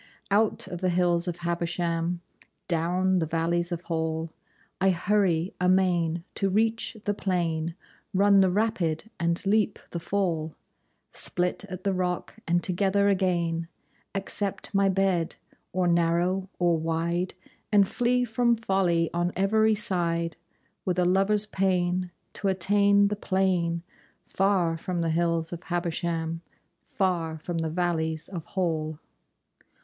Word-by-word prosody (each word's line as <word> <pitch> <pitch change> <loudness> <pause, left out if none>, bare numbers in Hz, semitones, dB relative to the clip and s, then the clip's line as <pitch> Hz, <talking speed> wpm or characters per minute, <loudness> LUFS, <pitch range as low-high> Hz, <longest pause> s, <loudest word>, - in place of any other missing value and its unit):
Out 210 +2 +2
of 175 0 -6
the 185 - +2
hills 175 0 +2
of 175 -1 -2
Habersham, 170 0 -1 0.5
Down 180 +2 +1
the 160 - 0
valleys 170 +2 0
of 175 0 -3
Hall, 160 -1 -2 0.5
I 190 - +5
hurry 185 -2 +1
amain 180 -3 +2
to 195 - +1
reach 225 +3 0
the 205 - +1
plain, 170 -4 -1 0.4
Run 200 0 +5
the 190 - +4
rapid 200 -2 0
and 170 +1 0
leap 210 +1 +2
the 170 - -3
fall, 170 -3 -1 0.6
Split 180 +3 +1
at 185 -2 -8
the 200 -1 +1
rock 180 +2 -2
and 175 +1 +2
together 200 +2 +2
again, 170 -4 0 0.5
Accept 195 0 -3
my 195 0 +3
bed, 190 -3 +1 0.4
or 185 -1 +1
narrow 175 +3 +1
or 170 -2 +2
wide, 170 +3 -1 0.4
And 200 -2 +5
flee 245 +3 +1
from 235 +1 +2
folly 190 -6 +1
on 175 +1 0
every 215 +3 +3
side 170 -5 -1 0.5
With 180 -1 -1
a 180 - +3
lover's 195 +3 +2
pain 185 -2 0 0.2
to 200 - -2
attain 200 +2 +4
the 210 - -1
plain 185 -4 0 0.4
Far 185 -4 +1
from 175 0 -2
the 165 -1 0
hills 165 0 0
of 170 - -6
Habersham, 170 -2 -2 0.5
Far 180 - -1
from 165 +2 -4
the 160 -1 -1
valleys 160 -2 -1
of 175 -4 -6
Hall. 160 -5 -2
180 Hz, 135 wpm, -27 LUFS, 170-195 Hz, 0.6 s, I